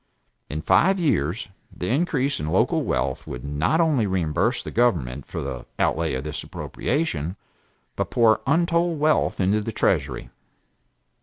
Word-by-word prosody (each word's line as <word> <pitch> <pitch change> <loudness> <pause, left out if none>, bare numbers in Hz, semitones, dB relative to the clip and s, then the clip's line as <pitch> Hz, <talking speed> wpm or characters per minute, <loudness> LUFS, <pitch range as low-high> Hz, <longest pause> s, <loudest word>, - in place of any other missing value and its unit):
In 75 +1 -4
five 190 - +4
years 105 - 0 0.2
the 90 - -5
increase 140 -1 +1
in 75 - -3
local - - +2
wealth 65 -1 -2
would 60 +2 -6
not 75 - +1
only 150 -10 +3
reimburse 90 -5 0
the - - -6
government 75 - 0
for - - -5
the 65 - -6
outlay 80 -3 +1
in 65 - -3
this 75 0 -5
appropriation, 95 - -2 0.6
but - - -2
pour 110 -3 +4
untold 170 +1 +2
wealth 155 +1 +2
into 100 +3 +2
the 115 - -4
treasury. - - 0
105 Hz, 145 wpm, -24 LUFS, -, 0.6 s, five